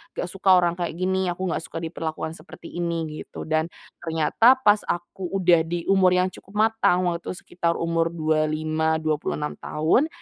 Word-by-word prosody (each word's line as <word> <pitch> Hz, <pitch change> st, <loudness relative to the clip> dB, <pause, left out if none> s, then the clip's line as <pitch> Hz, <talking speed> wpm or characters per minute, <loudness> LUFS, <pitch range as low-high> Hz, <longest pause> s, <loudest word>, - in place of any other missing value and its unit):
nggak -, -, -2 dB
suka 195 Hz, -1 st, +4 dB
orang 175 Hz, 0 st, +2 dB
kayak 170 Hz, -2 st, -2 dB
gini, 190 Hz, +1 st, 0 dB
aku 175 Hz, +1 st, -3 dB
nggak -, -, -1 dB
suka 165 Hz, -, -6 dB
diperlakukan 160 Hz, -1 st, -4 dB
seperti 165 Hz, -, -12 dB
ini, 170 Hz, -1 st, -1 dB, 0.2 s
gitu. -, -, -8 dB
Dan, 160 Hz, +1 st, 0 dB, 0.3 s
ternyata 165 Hz, -, +3 dB
pas 205 Hz, 0 st, +5 dB
aku 175 Hz, +2 st, -4 dB
udah 180 Hz, -3 st, +4 dB
di 170 Hz, 0 st, -3 dB
umur 185 Hz, -2 st, +4 dB
yang 185 Hz, +1 st, +2 dB
cukup 195 Hz, -, -15 dB
matang, 215 Hz, -4 st, +3 dB
waktu 170 Hz, -, -3 dB
itu -, -, -3 dB
sekitar 170 Hz, -1 st, -1 dB
umur 165 Hz, 0 st, 0 dB
25, 155 Hz, -1 st, 0 dB
26 150 Hz, -1 st, -1 dB
tahun. 160 Hz, -, +1 dB
170 Hz, 170 wpm, -24 LUFS, 160-185 Hz, 0.3 s, pas